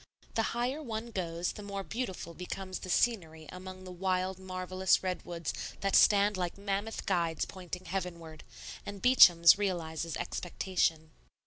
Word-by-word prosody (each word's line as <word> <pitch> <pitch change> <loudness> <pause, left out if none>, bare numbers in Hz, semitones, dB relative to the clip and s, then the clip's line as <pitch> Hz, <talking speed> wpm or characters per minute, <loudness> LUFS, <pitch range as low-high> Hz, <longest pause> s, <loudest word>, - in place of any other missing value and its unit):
The 225 - +2 0.2
higher 255 +5 -1
one 230 -3 -5
goes 175 -3 -2
the - - -9
more 200 -1 -5
beautiful 190 -7 -5
becomes 185 +2 -6
the 185 - -8
scenery 165 -8 0
among 185 0 -9
the 185 - -8
wild, 185 +1 -1
marvellous 185 0 0
redwoods 175 -3 -3 0.3
that 195 -1 +1
stand 205 -1 +5
like 180 0 -2
mammoth 200 +2 -3
guides 170 -4 0
pointing 185 -1 -8
heavenward; 170 -4 -5 0.4
and 205 0 -7
Beacham's 180 -7 +7
realizes 165 -5 -2
expectation. 165 -3 -1
185 Hz, 135 wpm, -31 LUFS, 170-200 Hz, 0.4 s, Beacham's